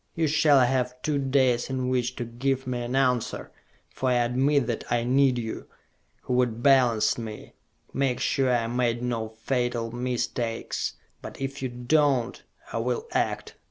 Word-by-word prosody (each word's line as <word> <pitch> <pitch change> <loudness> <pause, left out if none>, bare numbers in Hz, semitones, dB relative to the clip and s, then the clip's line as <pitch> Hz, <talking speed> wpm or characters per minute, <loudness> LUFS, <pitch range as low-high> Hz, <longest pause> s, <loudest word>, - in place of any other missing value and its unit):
You 165 - +1
shall 150 -2 +4
have 125 0 0
two 150 -2 0
days 130 -3 +2
in 130 -1 -2
which 125 -1 0
to 120 - -4
give 130 +3 -2
me 125 -1 -2
an 120 +2 -3
answer, 125 -3 0 0.4
for 130 - -1
I - - +3
admit 125 +3 +2
that 115 -1 -3
I 120 -1 +2
need 130 +1 +3
you, 110 -2 -5 0.6
who - - -2
would 120 -2 +1
balance 125 -6 +4
me, 110 -2 -8 0.4
make 135 -2 0
sure 135 -2 +1
I 120 -2 +1
made 120 0 0
no 115 -3 -2
fatal 120 0 -2
mistakes! 120 -1 -2 0.3
But - - -9
if 135 +1 -4
you 130 - -2
do 125 +5 +1
not, 135 -5 +1 0.3
I - - -1
will 455 - -1
act - - -2
125 Hz, 165 wpm, -26 LUFS, 120-135 Hz, 0.6 s, shall